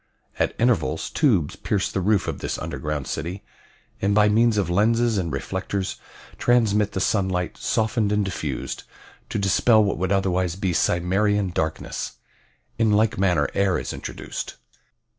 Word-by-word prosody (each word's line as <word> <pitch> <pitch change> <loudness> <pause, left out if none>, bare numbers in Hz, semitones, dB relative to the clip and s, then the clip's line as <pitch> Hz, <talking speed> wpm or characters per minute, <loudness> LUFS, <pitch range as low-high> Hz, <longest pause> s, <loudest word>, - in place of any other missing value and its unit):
At - - +1
intervals 100 -10 +1
tubes 105 - +2
pierce 100 -2 -1
the 95 - -1
roof 105 +1 +2
of - - -3
this - - -3
underground 75 -2 -4
city, 90 +5 -4 0.6
and 100 +1 +2
by 105 0 +5
means 115 +1 +3
of 100 -5 +1
lenses 110 +4 +2
and 85 -3 -2
reflectors 95 +6 -3 0.4
transmit 105 -4 +2
the - - -1
sunlight, 95 -2 0
softened 110 -2 0
and 105 -1 +1
diffused, 75 -8 -4 0.5
to - - -2
dispel 105 +3 +4
what 100 -4 -1
would 95 +1 -1
otherwise 95 -3 +1
be 95 -2 -1
Cimmerian 95 +4 +1
darkness. 80 -2 -3 0.7
In 110 -2 +3
like 105 -1 +2
manner 90 -7 +2
air 100 -2 +2
is - - -4
introduced. - - -6
100 Hz, 145 wpm, -24 LUFS, 90-105 Hz, 0.7 s, by